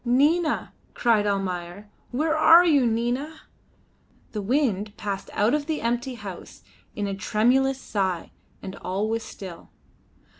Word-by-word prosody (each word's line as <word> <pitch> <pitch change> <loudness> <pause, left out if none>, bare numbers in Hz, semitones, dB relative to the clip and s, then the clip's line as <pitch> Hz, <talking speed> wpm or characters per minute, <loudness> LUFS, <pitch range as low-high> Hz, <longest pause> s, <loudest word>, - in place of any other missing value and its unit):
"Nina!" 295 +7 +2 0.2
cried 220 -3 +2
Almayer. 190 0 -3 0.2
"Where 310 +5 0
are 325 +3 +7
you, 285 -7 +4
Nina?" 245 +7 -2 0.9
The 210 - -3
wind 215 -3 0
passed 200 -2 -4
out 210 +5 +2
of 300 -1 0
the 315 -2 -2
empty 240 +2 -1
house 200 -6 -9 0.3
in 205 - -2
a 200 - -2
tremulous 255 +7 +2
sigh, 190 -8 -2 0.3
and 190 - -6
all 195 +3 -2
was 225 +1 -1
still. 185 -5 -10
230 Hz, 135 wpm, -25 LUFS, 200-270 Hz, 0.9 s, are